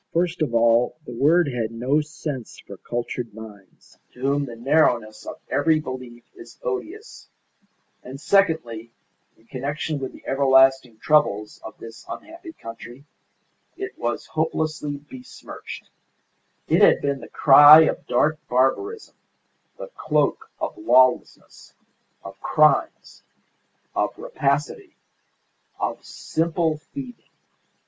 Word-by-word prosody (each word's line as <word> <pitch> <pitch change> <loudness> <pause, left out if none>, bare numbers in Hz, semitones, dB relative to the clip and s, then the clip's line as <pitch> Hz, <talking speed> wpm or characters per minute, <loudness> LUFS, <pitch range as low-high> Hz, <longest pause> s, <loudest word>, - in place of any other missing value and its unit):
First 170 0 -1
of 125 -7 -1
all, 115 +3 +3
the - - -9
word 155 +8 +3
had 120 -5 -2
no 130 +6 0
sense 150 -5 -7
for - - -12
cultured 120 -2 -5
minds, 105 -4 -14
to - - -18
whom 140 +2 0
the 120 -3 -9
narrowness 120 -4 +1
of - - -8
every 150 +4 +2
belief 130 -4 -8
is 360 -2 -14
odious; 425 -2 -6 0.7
and 130 +2 -10
secondly, 155 - +1 0.5
in 110 - -27
connection 145 +4 -4
with 130 -1 -5
the - - -17
everlasting 135 -3 +3
troubles 110 -7 +1
of 110 - -10
this 115 0 -12
unhappy 335 +1 -9
country 120 - -11 0.7
it 390 0 -6
was 120 0 -3
hopelessly 155 -2 -2
besmirched; 130 -3 -11 0.8
it - - +2
had - - +6
been 140 -1 -1
the - - -12
cry 145 +2 +8
of 160 - -1
dark 155 +1 +1
barbarism, 135 - 0 0.6
the - - -9
cloak 445 - -1
of - - -4
lawlessness, 130 - +1 0.5
of - - -11
crimes, 150 -3 +1 0.7
of - - -1
rapacity, 150 - -2 0.8
of - - -3
simple 160 -1 -2
thieving. 255 -4 -9
140 Hz, 120 wpm, -23 LUFS, 120-160 Hz, 0.8 s, cry